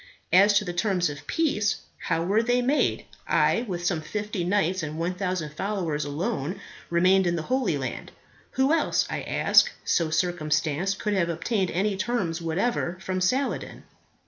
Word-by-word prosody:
As 200 +3 +6
to 210 - +1
the 175 - -4
terms 180 -3 +1
of 145 - -11
peace, 275 -11 0 0.2
how 165 - -1
were 200 +5 +2
they 245 +1 +1
made? 275 +5 +1 0.2
I, 235 - +2
with 175 -3 -4
some 175 -3 0
fifty 210 +2 -3
knights 185 0 +1
and 155 0 -5
1000 180 -2 -2
followers 170 -5 -2
alone 170 - -3 0.3
remained 185 +2 +4
in 175 - +1
the 165 - -3
Holy 245 - 0
Land. 130 -2 -5 0.4
Who 265 +3 +2
else, 330 - +2
I - - -2
ask, - - +4
so 165 -2 +1
circumstanced, 160 +2 0
could 210 - -1
have 180 -4 +1
obtained 185 +3 -1
any 200 +3 0
terms 185 -5 -2
whatever 175 +2 -1
from 185 0 -3
Saladin? 260 +9 -1
185 Hz, 160 wpm, -26 LUFS, 165-210 Hz, 0.4 s, As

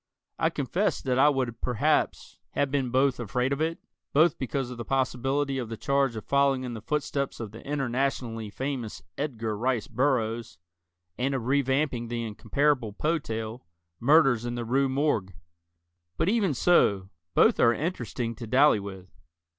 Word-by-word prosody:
I - - +3
confess - - -1
that 130 -1 0
I 145 +2 +7
would 125 -5 -2
perhaps 125 -4 0
have 140 -1 0
been 135 -3 0
afraid 125 -1 +1
of 140 - -3
it, 165 +1 0 0.4
both 155 +2 +4
because 130 -1 -2
of 120 - -8
the - - -3
possibility 135 +2 0
of 120 -3 -4
the 115 - -5
charge 140 -2 +1
of 110 - -6
following 140 -2 +2
in 125 -1 -4
the 110 - -7
footsteps 140 +2 -2
of 110 -3 -5
the 115 - -10
internationally 130 -5 -2
famous 120 - -4
Edgar 115 -7 -3
Rice 120 +1 0
Burroughs, 120 -4 -1 0.6
and 135 +2 0
of 125 -4 -3
re 140 +3 +3
vamping 130 -3 0
the 120 0 -3
incomparable 115 +2 0
Poe 160 +9 0
tale, 110 - -6 0.3
"Murders 135 -3 +4
in 120 0 -3
the 120 -1 -3
Rue 135 +3 +2
Morgue." 130 - 0 0.8
But, 175 - +2
even 200 - +2
so, 100 - +3 0.3
both - - +5
are 115 - +6
interesting 120 -5 -3
to 115 - -7
dally 130 0 +5
with. 95 -2 -8
130 Hz, 160 wpm, -27 LUFS, 115-140 Hz, 0.8 s, I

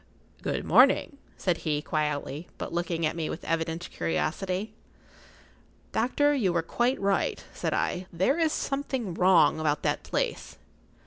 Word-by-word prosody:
"Good - - -2
morning," 280 - +5 0.2
said 180 -3 0
he, 150 -2 -1
quietly, 150 0 -2
but - - -5
looking 170 -1 -1
at 155 - -1
me 165 -2 -2
with - - -6
evident 165 +1 -2
curiosity. 180 - -2 1.2
"Doctor, 290 +5 +2
you 220 -10 +2
were 170 -1 0
quite 240 +9 0
right," 200 0 0
said - - -2
I. 180 +1 -1
"There 190 - +1
is 320 -2 +3
something 270 - -2
wrong 180 -2 +4
about 150 -2 0
that - - 0
place." - - -3
175 Hz, 140 wpm, -28 LUFS, 160-220 Hz, 1.2 s, morning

